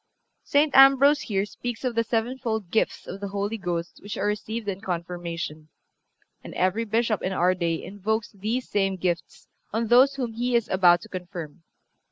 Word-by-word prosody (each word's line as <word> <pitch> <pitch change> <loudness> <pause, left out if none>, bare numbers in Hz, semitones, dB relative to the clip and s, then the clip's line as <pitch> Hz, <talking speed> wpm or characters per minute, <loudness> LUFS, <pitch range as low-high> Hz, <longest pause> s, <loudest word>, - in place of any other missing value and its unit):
(362) - - +1
St. 285 -2 +8
Ambrose 280 +2 +3
here 195 -2 -1
speaks 240 +3 -6
of 250 -2 -1
the 230 0 +1
sevenfold 225 -3 -2
gifts 220 - 0
of 195 - -7
the 200 - -4
Holy 200 +2 -2
Ghost 175 -2 -4
which 205 - -6
are 195 - -1
received 210 +1 -3
in 195 -1 -3
Confirmation, 170 -4 -5 0.7
and - - -9
every 190 +5 +1
Bishop 225 -1 0
in 190 - -2
our 180 0 +3
day 170 -3 -2
invokes 210 +2 -2
these 220 +6 -3
same 195 -2 0
gifts 175 -2 -3 0.2
on 225 0 -1
those 260 +3 +6
whom 245 -4 -3
he 245 +2 -1
is 235 -2 +2
about 175 -2 +5
to - - -11
confirm. 175 -4 -7
205 Hz, 180 wpm, -25 LUFS, 180-230 Hz, 0.7 s, St